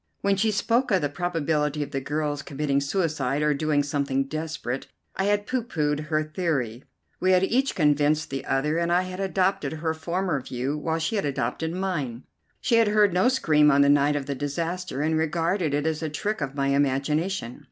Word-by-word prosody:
When 200 0 +2
she 220 +3 +2
spoke 235 +5 +1
of 190 -4 +3
the 145 - +1
probability 150 -2 -1
of 145 - -8
the 135 - -2
girl's 145 +1 -2
committing 140 0 -1
suicide 150 -3 0
or 150 0 +3
doing 145 0 +1
something 140 -1 0
desperate, 155 -3 -4 0.3
I 190 - 0
had 205 0 +1
pooh 255 +3 -1
poohed 150 -9 -2
her 155 0 +1
theory. 150 -8 -2 0.4
We 185 +1 +3
had 185 0 +4
each 260 +7 +1
convinced 150 -1 +2
the 135 -1 -3
other, 150 +4 0
and 170 0 0
I 180 +1 +3
had 185 0 -7
adopted 190 -5 0
her 160 0 -2
former 170 -1 -2
view 130 +3 -3
while 160 +2 -1
she 165 +7 -1
had 200 - -1
adopted 140 +3 -2
mine. 165 -10 -3 0.4
She 235 - +3
had 230 -1 +4
heard 210 -2 +4
no 185 +7 +4
scream 155 - +4
on 140 -1 +5
the 140 - +5
night 145 +1 +4
of 145 -2 -2
the 140 - -2
disaster, 165 +3 -3
and 160 +1 +1
regarded 165 +1 0
it 145 +1 -1
as 160 0 -1
a 160 - -2
trick 205 +6 -3
of 135 -1 -3
my 140 -1 0
imagination. 140 +1 0
155 Hz, 200 wpm, -25 LUFS, 145-180 Hz, 0.4 s, on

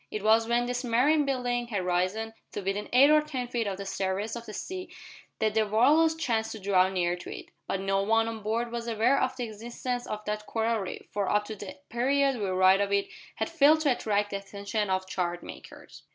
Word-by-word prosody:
It 210 - -5
was 225 +1 +4
when 240 +1 +2
this 245 +1 -2
marine 270 +6 +3
building 245 -3 -1
had 200 -6 -2
risen 185 +5 -1 0.2
to - - -3
within 195 +2 -3
eight 275 +4 +6
or 305 0 +6
ten 265 -5 -4
feet 235 -3 -2
of 195 -1 -3
the 200 - -6
surface 195 +3 -2
of 235 0 -8
the - - -6
sea 370 - -6 0.5
that 215 -1 +1
the 220 -1 +2
Walrus 300 +10 +4
chanced 230 -8 -1
to 220 - -8
draw 190 -1 +3
near 175 -2 0
to 175 - -9
it, - - -8 0.2
but 195 - -1
no 195 0 0
one 225 +2 +2
on 225 -1 -5
board 230 +3 -1
was 235 0 -4
aware 235 +4 +2
of 260 0 0
the 250 - -2
existence 240 +3 -5
of 210 0 -5
that 210 0 -3
coral 225 0 0
reef, 190 -2 -6
for 200 -2 -1
up 210 0 +2
to 220 - -6
the 200 -1 -9
period 270 +3 +2
we 205 - -1
write 185 +1 +4
of 200 0 -1
it 200 0 +1 0.3
had - - -2
failed 315 -1 +4
to 290 -3 +3
attract 205 -4 0
the 200 - -1
attention 200 +1 -3
of 190 0 0
chart 175 -2 -2
makers. - - -12
220 Hz, 225 wpm, -28 LUFS, 200-245 Hz, 0.5 s, eight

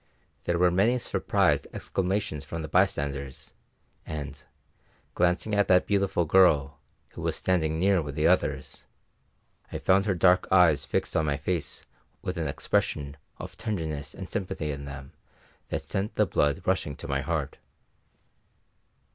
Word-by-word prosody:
There 85 - +1
were 90 0 +4
many 105 +8 +3
surprised 125 - +1
exclamations 95 -5 -2
from 80 +3 -6
the - - -4
bystanders, 70 -2 -1 0.5
and, 70 -2 -6 0.7
glancing 90 +4 +1
at 100 0 +3
that 90 0 +4
beautiful 100 -4 +1
girl, 75 -5 +4 0.3
who - - -9
was - - -1
standing 80 -4 0
near 95 +1 +3
with 70 -2 -6
the 75 +1 0
others, 75 -6 0 0.8
I - - -3
found 95 +1 +3
her 100 -3 +1
dark 90 +1 +4
eyes 90 -5 +5
fixed - - -2
on 80 -1 +2
my 70 -1 0
face 80 +3 -3 0.4
with 90 0 -3
an 80 -2 -1
expression 70 0 -1 0.2
of - - -8
tenderness 80 -9 -4
and - - -7
sympathy 80 -5 -3
in 70 0 -6
them 70 -1 -9 0.6
that - - -3
sent 100 +3 -3
the 105 - +3
blood 80 -1 +1
rushing 85 -6 0
to - - -8
my 70 0 -1
heart. 75 -2 -3
80 Hz, 145 wpm, -27 LUFS, 70-95 Hz, 0.8 s, eyes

